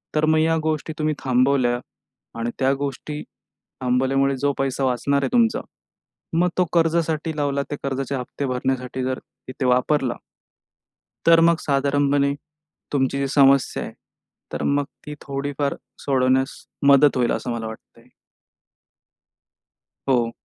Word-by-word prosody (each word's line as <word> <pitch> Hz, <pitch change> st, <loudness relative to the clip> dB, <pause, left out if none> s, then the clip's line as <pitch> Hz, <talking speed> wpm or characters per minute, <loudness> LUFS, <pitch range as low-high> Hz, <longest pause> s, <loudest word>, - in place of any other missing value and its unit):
तर 155 Hz, 0 st, +3 dB
मग 155 Hz, 0 st, +3 dB
या 160 Hz, +1 st, +2 dB
गोष्टी 155 Hz, 0 st, -2 dB
तुम्ही 155 Hz, 0 st, +1 dB
थांबवल्या 130 Hz, -1 st, +2 dB, 0.6 s
आणि 115 Hz, +1 st, -1 dB
त्या 135 Hz, +1 st, +3 dB
गोष्टी 145 Hz, +2 st, -4 dB, 0.6 s
थांबवल्यामुळे 135 Hz, +2 st, +2 dB
जो 145 Hz, +2 st, +1 dB
पैसा 135 Hz, 0 st, -1 dB
वाचणार 140 Hz, +3 st, +1 dB
आहे -, -, 0 dB
तुमचा, 235 Hz, -1 st, +3 dB, 0.8 s
मग 180 Hz, +1 st, +3 dB
तो 180 Hz, -, +4 dB
कर्जासाठी 165 Hz, -1 st, +1 dB
लावला, 140 Hz, -1 st, 0 dB
त्या 145 Hz, -, -3 dB
कर्जाचे 135 Hz, 0 st, -2 dB
हप्ते 130 Hz, +2 st, -4 dB
भरण्यासाठी 130 Hz, 0 st, -2 dB
जर 130 Hz, 0 st, -2 dB, 0.3 s
तिथे 130 Hz, +1 st, -4 dB
वापरला 125 Hz, +1 st, +2 dB, 1.1 s
तर 165 Hz, 0 st, +7 dB
मग 170 Hz, 0 st, +5 dB
साधारणपणे 140 Hz, 0 st, +1 dB, 0.6 s
तुमची 135 Hz, 0 st, +1 dB
जी 140 Hz, -, 0 dB
समस्या 135 Hz, -1 st, +3 dB
आहे, -, -, -7 dB, 0.6 s
तर -, -, -3 dB
मग 145 Hz, 0 st, +2 dB, 0.2 s
ती 150 Hz, -, -6 dB
थोडीफार 140 Hz, 0 st, -2 dB, 0.2 s
सोडवण्यास 130 Hz, -1 st, +1 dB, 0.3 s
मदत 140 Hz, -1 st, +6 dB
होईल, 120 Hz, -1 st, +2 dB
असं 125 Hz, -, -2 dB
मला 115 Hz, -1 st, -3 dB
वाटतंय. 110 Hz, -, -12 dB, 2.0 s
हो. 120 Hz, -3 st, +2 dB
140 Hz, 130 wpm, -22 LUFS, 130-150 Hz, 2.0 s, तर